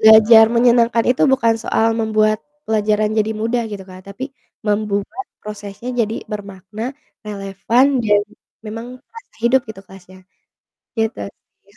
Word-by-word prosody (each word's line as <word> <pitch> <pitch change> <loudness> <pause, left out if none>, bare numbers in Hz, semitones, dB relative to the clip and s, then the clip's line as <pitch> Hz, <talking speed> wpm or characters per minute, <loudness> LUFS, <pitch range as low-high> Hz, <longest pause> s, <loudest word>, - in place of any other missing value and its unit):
belajar 220 +1 +8
menyenangkan 235 -1 +4
itu 255 - +1
bukan 230 -4 +3
soal 225 - +1
membuat 215 -1 +2 0.3
pelajaran 215 -1 +1
jadi 215 +1 +1
mudah 235 +2 0
gitu, 200 -2 -6
Kak, 185 - -11
tapi 200 +6 -6 0.4
membuat 210 +3 -1
prosesnya 210 +2 -8
jadi 220 -1 0 0.2
bermakna, 200 +1 -7 0.4
relevan, 200 +5 +1 0.2
dan 205 -1 +4 0.4
memang 225 +2 -6 0.2
terasa 455 +1 -15
hidup 255 +3 +4
gitu 205 -3 -8
kelasnya. 185 -1 -15 0.8
Gitu 225 0 +1 0.2
sih, 200 0 -32
215 Hz, 130 wpm, -19 LUFS, 205-230 Hz, 0.8 s, belajar